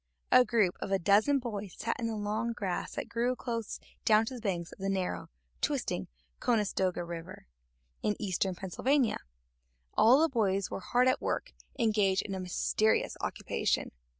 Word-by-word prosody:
A 255 Hz, -, +8 dB
group 220 Hz, -7 st, +2 dB
of -, -, -4 dB
a 195 Hz, -, +4 dB
dozen 205 Hz, +10 st, +4 dB
boys 210 Hz, -7 st, -5 dB
sat 230 Hz, -, -1 dB
in 230 Hz, -, -1 dB
the 225 Hz, -, -2 dB
long 215 Hz, +3 st, -1 dB
grass 195 Hz, -6 st, -3 dB
that -, -, -3 dB
grew 240 Hz, +2 st, 0 dB
close 230 Hz, -4 st, -4 dB, 0.2 s
down 215 Hz, 0 st, +5 dB
to 260 Hz, -, -5 dB
the 245 Hz, -, -7 dB
banks 175 Hz, -5 st, -2 dB
of -, -, -13 dB
the 195 Hz, +1 st, -2 dB
narrow, 190 Hz, -2 st, -2 dB, 0.3 s
twisting -, -, -1 dB, 0.3 s
Conestoga 195 Hz, -6 st, +1 dB
River, 170 Hz, +2 st, -8 dB, 0.6 s
in 210 Hz, -, +1 dB
eastern 190 Hz, -2 st, -1 dB
Pennsylvania. 245 Hz, +8 st, +1 dB, 0.7 s
All 235 Hz, +4 st, +6 dB
of 325 Hz, -, +2 dB
the -, -, -30 dB
boys 195 Hz, -4 st, +1 dB
were -, -, -3 dB
hard 245 Hz, +6 st, +2 dB
at 255 Hz, -, +2 dB
work -, -, -2 dB, 0.2 s
engaged 210 Hz, -5 st, +2 dB
in 195 Hz, -, -5 dB
a 190 Hz, -, -3 dB
mysterious 185 Hz, +4 st, +1 dB
occupation. -, -, -1 dB
210 Hz, 170 wpm, -31 LUFS, 190-235 Hz, 0.7 s, A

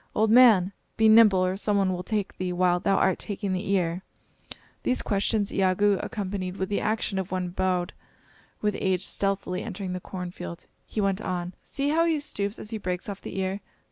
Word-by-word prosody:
Old 220 Hz, +1 st, +3 dB
man! 220 Hz, -6 st, +6 dB, 0.2 s
be 220 Hz, -1 st, +5 dB
nimble, 215 Hz, -4 st, +6 dB
or 185 Hz, +1 st, 0 dB
some 205 Hz, +1 st, 0 dB
one 190 Hz, -2 st, +2 dB
will 180 Hz, -, -3 dB
take 205 Hz, +1 st, -2 dB
thee 185 Hz, -1 st, -1 dB
while 180 Hz, 0 st, +2 dB
thou 195 Hz, +2 st, +2 dB
art 190 Hz, -, +2 dB
taking 200 Hz, -2 st, -3 dB
the 185 Hz, +2 st, -3 dB
ear." 180 Hz, -2 st, +1 dB, 0.8 s
These 255 Hz, -, 0 dB
questions 205 Hz, 0 st, 0 dB
Iagoo 195 Hz, +1 st, +2 dB
accompanied 195 Hz, -4 st, -4 dB
with 190 Hz, -, -2 dB
the 205 Hz, -, 0 dB
action 215 Hz, -2 st, 0 dB
of 190 Hz, 0 st, -4 dB
one 185 Hz, -1 st, -1 dB
bowed 180 Hz, -1 st, -1 dB, 0.7 s
with 210 Hz, -1 st, 0 dB
age 190 Hz, 0 st, 0 dB
stealthily 195 Hz, -2 st, -1 dB
entering' 195 Hz, -4 st, -5 dB
the 180 Hz, -, -3 dB
cornfield. 180 Hz, -, -7 dB, 0.2 s
He 215 Hz, -, -2 dB
went 195 Hz, 0 st, 0 dB
on: 180 Hz, -1 st, -3 dB
"See 280 Hz, 0 st, -2 dB
how 330 Hz, +2 st, +3 dB
he 325 Hz, -2 st, +2 dB
stoops 205 Hz, -8 st, -3 dB
as 215 Hz, -, -8 dB
he 220 Hz, -, -3 dB
breaks 180 Hz, -2 st, -3 dB
off 200 Hz, -1 st, -6 dB
the -, -, -7 dB
ear. 190 Hz, +1 st, -2 dB
195 Hz, 195 wpm, -26 LUFS, 185-210 Hz, 0.8 s, man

